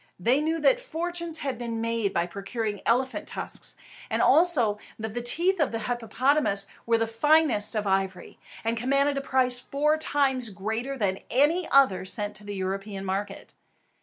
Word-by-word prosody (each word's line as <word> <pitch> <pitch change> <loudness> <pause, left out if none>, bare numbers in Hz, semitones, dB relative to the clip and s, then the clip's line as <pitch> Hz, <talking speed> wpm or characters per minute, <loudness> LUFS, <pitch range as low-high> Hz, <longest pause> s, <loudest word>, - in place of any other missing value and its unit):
They 250 +10 +2
knew 320 +2 0
that - - +4
fortunes 340 -7 -2
had 270 -6 -4
been 230 -2 -4
made 230 -3 -1
in 170 - +1
procuring 205 +2 -4
elephants' 260 +2 0
tusks, - - -4 0.3
and - - -1
also 265 -12 +4 0.2
that 220 -1 -5
the 240 - -3
teeth 345 +10 +1
of 300 - +1
the 225 - -2
hippopotamus 240 0 +1 0.2
were 230 0 +4
the 225 - +1
finest 240 -2 +3
of 215 -1 -1
ivory, 190 -1 -2 0.2
and 225 +1 0
commanded 275 +4 +1
a - - -5
price 255 -2 +1
four 295 +4 0
times 270 -6 0
greater 220 +8 -4
than 195 -4 -1
any 310 +7 +2
other 270 -10 +4
sent 205 +2 -2
to 210 - -12
the 205 0 -6
European 195 +1 -4
market. 195 +1 -4
235 Hz, 165 wpm, -26 LUFS, 205-285 Hz, 0.3 s, that